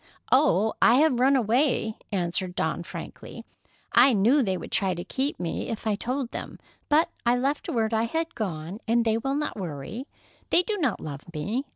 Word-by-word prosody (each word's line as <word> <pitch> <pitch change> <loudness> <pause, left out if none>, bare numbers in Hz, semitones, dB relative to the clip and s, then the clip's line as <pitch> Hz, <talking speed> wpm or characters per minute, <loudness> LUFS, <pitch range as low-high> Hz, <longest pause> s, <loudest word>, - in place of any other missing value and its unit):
"Oh, 250 -6 +4
I 235 - +7
have 275 -3 +3
run 270 +2 +4
away," 240 -2 +1 0.2
answered 180 -1 -1
Dawn 160 +1 -1
frankly. 170 - -9 0.5
"I 270 - +6
knew 230 +8 +4
they 190 -6 0
would - - -8
try 190 -2 +1
to 175 - -5
keep 270 +9 -2
me 170 -2 -3
if 225 0 -5
I 215 - +2
told 250 +4 -3
them, - - -6 0.3
but 305 +3 +3
I 240 +1 +3
left 275 +4 -1
word 225 -2 0
I 225 +1 +2
had 325 +7 -2
gone, 180 -2 -4
and 235 +1 +2
they 225 0 +2
will 270 +4 -1
not 300 -4 -2
worry. 185 - -6 0.4
They 355 - +5
do 430 +3 -2
not 280 - 0
love 145 -2 -6
me. 215 - -2
230 Hz, 190 wpm, -26 LUFS, 190-270 Hz, 0.5 s, I